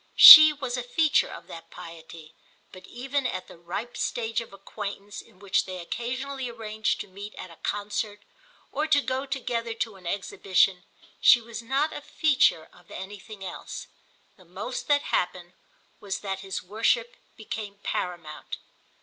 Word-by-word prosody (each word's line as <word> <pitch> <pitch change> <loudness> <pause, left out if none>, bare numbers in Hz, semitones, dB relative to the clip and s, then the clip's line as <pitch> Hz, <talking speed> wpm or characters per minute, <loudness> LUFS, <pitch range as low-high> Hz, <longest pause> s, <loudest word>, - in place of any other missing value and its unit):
She 310 -1 +13
was 260 -4 -4
a - - -2
feature 300 +5 +2
of - - -10
that 165 - -11
piety, 165 -2 -12 0.4
but 185 -1 -13
even 265 +2 -2
at 185 -5 -5
the - - -13
ripe 195 +8 -6
stage 225 -1 -2
of 230 - -11
acquaintance 200 0 -7
in - - -22
which 195 0 0
they 185 -1 -6
occasionally 255 +8 -4
arranged 220 -2 -2
to - - -8
meet 200 +2 -10
at 185 - -9
a - - -13
concert 205 0 -3 0.5
or 300 +3 -1
to 305 -2 +4
go 265 0 -3
together 235 -4 -3
to 225 -3 -4
an 180 -2 -11
exhibition 190 -1 +1 0.3
she 240 - +7
was 235 0 -8
not 270 +6 0
a - - -6
feature 290 - +2
of 175 -1 -21
anything 200 +1 -9
else. 180 - -7 0.5
The - - -19
most - - -6
that 290 -1 +3
happened 180 0 -2 0.5
was 200 -2 -5
that 195 -2 -4
his 190 -1 -5
worship 225 +4 0 0.2
became 215 -2 -6
paramount. 170 -4 -4
215 Hz, 160 wpm, -26 LUFS, 185-250 Hz, 0.5 s, She